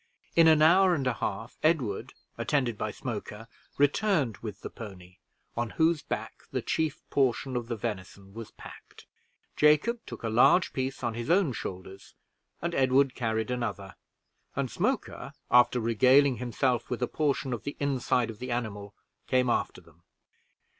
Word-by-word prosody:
In 165 Hz, -1 st, +7 dB
an 155 Hz, -1 st, +6 dB
hour 180 Hz, +3 st, +6 dB
and 140 Hz, -4 st, -2 dB
a 125 Hz, -, +1 dB
half, 110 Hz, +1 st, -5 dB
Edward, 140 Hz, -11 st, 0 dB, 0.2 s
attended 130 Hz, -6 st, 0 dB
by 110 Hz, -, -3 dB
Smoker, 110 Hz, -1 st, -6 dB, 0.3 s
returned 145 Hz, -, +2 dB
with 105 Hz, -2 st, -8 dB
the -, -, -7 dB
pony, 95 Hz, -4 st, -11 dB, 0.4 s
on 120 Hz, -1 st, -2 dB
whose 160 Hz, -1 st, +3 dB
back -, -, -5 dB
the -, -, -3 dB
chief 155 Hz, -1 st, -2 dB
portion 130 Hz, -1 st, +1 dB
of 120 Hz, -1 st, -2 dB
the 120 Hz, -, -2 dB
venison 100 Hz, -3 st, -6 dB
was 115 Hz, -1 st, -8 dB
packed. -, -, -14 dB, 0.5 s
Jacob 150 Hz, +11 st, +3 dB
took -, -, -9 dB
a -, -, -1 dB
large 125 Hz, +10 st, +4 dB
piece 130 Hz, 0 st, -3 dB
on 120 Hz, -1 st, -1 dB
his 120 Hz, +3 st, -5 dB
own 175 Hz, -6 st, +3 dB
shoulders, 95 Hz, -2 st, -8 dB, 0.5 s
and 170 Hz, 0 st, -1 dB
Edward 135 Hz, 0 st, +3 dB
carried 110 Hz, -1 st, -2 dB
another, 105 Hz, -6 st, -4 dB, 0.6 s
and -, -, -2 dB
Smoker, -, -, -2 dB, 0.2 s
after 125 Hz, 0 st, +5 dB
regaling 130 Hz, +4 st, +4 dB
himself 125 Hz, 0 st, -1 dB
with 125 Hz, 0 st, -2 dB
a -, -, +1 dB
portion 140 Hz, -4 st, -1 dB
of 120 Hz, -, -4 dB
the 145 Hz, -, -6 dB
inside 130 Hz, -4 st, 0 dB
of 110 Hz, -, -14 dB
the 125 Hz, -, -6 dB
animal, 105 Hz, -4 st, -4 dB, 0.3 s
came 125 Hz, -1 st, +2 dB
after -, -, -1 dB
them. -, -, -23 dB
125 Hz, 160 wpm, -28 LUFS, 110-140 Hz, 0.6 s, In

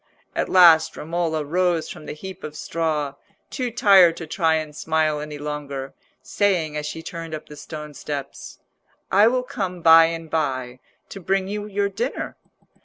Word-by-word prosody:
At -, -, -1 dB
last 170 Hz, -4 st, +6 dB
Romola 160 Hz, -1 st, -2 dB
rose 175 Hz, +1 st, +1 dB
from 155 Hz, -, -10 dB
the -, -, -4 dB
heap 190 Hz, +5 st, -9 dB
of 150 Hz, -, -7 dB
straw, 155 Hz, -4 st, -2 dB, 0.4 s
too 255 Hz, -3 st, -2 dB
tired 195 Hz, -7 st, +5 dB
to 165 Hz, -, -6 dB
try 160 Hz, +1 st, +1 dB
and 155 Hz, -1 st, -4 dB
smile 155 Hz, -1 st, 0 dB
any 150 Hz, 0 st, -6 dB
longer, 145 Hz, -2 st, -5 dB, 0.3 s
saying 180 Hz, -7 st, 0 dB
as 150 Hz, 0 st, -3 dB
she 160 Hz, +2 st, -6 dB
turned 165 Hz, -3 st, -6 dB
up 155 Hz, -, -10 dB
the 150 Hz, -, -11 dB
stone 150 Hz, 0 st, -8 dB
steps— 140 Hz, -1 st, -7 dB, 0.5 s
"I 205 Hz, +3 st, +6 dB
will 250 Hz, +1 st, +1 dB
come 190 Hz, -9 st, -5 dB
by 165 Hz, 0 st, +8 dB
and 165 Hz, 0 st, -4 dB
by, 130 Hz, -6 st, -2 dB, 0.3 s
to 195 Hz, -, -8 dB
bring 190 Hz, +1 st, 0 dB
you 205 Hz, +1 st, -4 dB
your 200 Hz, 0 st, 0 dB
dinner." 225 Hz, +7 st, -4 dB
165 Hz, 170 wpm, -23 LUFS, 150-190 Hz, 0.5 s, by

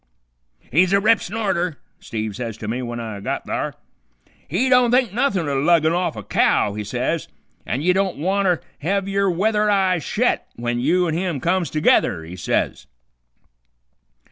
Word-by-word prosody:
"'He's 180 Hz, +6 st, +3 dB
a 200 Hz, -, +5 dB
rip 215 Hz, +2 st, +3 dB
snorter,' 180 Hz, -6 st, -2 dB, 0.2 s
Steve 110 Hz, -3 st, -5 dB
says 115 Hz, -1 st, -5 dB
to 110 Hz, -, -7 dB
me, 115 Hz, +4 st, -2 dB
w'en 120 Hz, -1 st, -4 dB
I 110 Hz, -3 st, -6 dB
got -, -, -3 dB
thar. -, -, -3 dB, 0.7 s
'He 190 Hz, -, 0 dB
don't 250 Hz, -2 st, +5 dB
think 245 Hz, -4 st, +2 dB
nuthin' 200 Hz, -, 0 dB
o' 140 Hz, -1 st, 0 dB
luggin' 160 Hz, 0 st, +3 dB
off 175 Hz, -7 st, -1 dB
a 110 Hz, -, -7 dB
cow,' 100 Hz, -, +2 dB
he 105 Hz, 0 st, -4 dB
says, 125 Hz, +9 st, -2 dB, 0.4 s
'an' 135 Hz, -, -2 dB
ye 180 Hz, +2 st, +4 dB
don't 190 Hz, -1 st, 0 dB
wanter 185 Hz, +2 st, +1 dB, 0.2 s
hev 195 Hz, +5 st, -1 dB
yer 195 Hz, 0 st, +1 dB
weather 210 Hz, +4 st, +1 dB
eye 190 Hz, -3 st, +2 dB
shet 235 Hz, -, 0 dB
w'en 120 Hz, 0 st, -2 dB
you 175 Hz, +8 st, +2 dB
an' 160 Hz, -, -1 dB
him 170 Hz, -3 st, -1 dB
comes 175 Hz, +2 st, 0 dB
together,' 95 Hz, -, +2 dB
he 85 Hz, +3 st, -9 dB
says. 90 Hz, -6 st, -2 dB
175 Hz, 170 wpm, -21 LUFS, 125-195 Hz, 0.7 s, a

